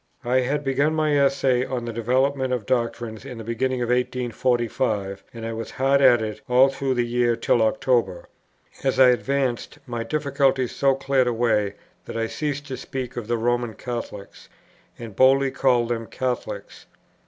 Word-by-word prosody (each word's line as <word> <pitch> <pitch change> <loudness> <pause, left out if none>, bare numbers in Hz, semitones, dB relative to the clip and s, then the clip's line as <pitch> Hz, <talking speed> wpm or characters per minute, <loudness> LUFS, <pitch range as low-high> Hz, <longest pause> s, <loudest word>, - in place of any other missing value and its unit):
I 125 +2 +2
had 140 +4 -1
begun 140 +3 +1
my 155 -1 +1
Essay 135 -3 +2
on 125 -2 -4
the 115 - -5
Development 130 +3 0
of 125 -5 -2
Doctrine 115 -2 -2
in 130 -3 -8
the 115 - -7
beginning 125 +2 -1
of 120 - -3
1845, 120 -4 -1
and 115 -1 -8
I 115 - -3
was 115 0 -5
hard 135 +1 +2
at 120 -4 +6
it 105 0 -5
all 130 +2 +6
through 135 -1 -2
the 120 -1 +1
year 120 0 +1
till 115 - +1
October. 110 -5 +1 0.6
As 135 -1 0
I 130 -1 +8
advanced, 125 +1 -1
my 120 -3 -4
difficulties 135 -1 0
so 135 -1 +3
cleared 135 -1 +1
away 110 -4 +1 0.3
that - - -6
I 115 - 0
ceased 145 +3 -3
to 130 - -4
speak 130 -2 -6
of 120 -3 -5
"the 120 0 0
Roman 120 0 -1
Catholics," 115 -5 -7 0.5
and 115 -4 -9
boldly 135 +2 +4
called 125 -4 +2
them 115 -1 -3
Catholics. 130 -2 -5
125 Hz, 170 wpm, -23 LUFS, 115-135 Hz, 0.6 s, I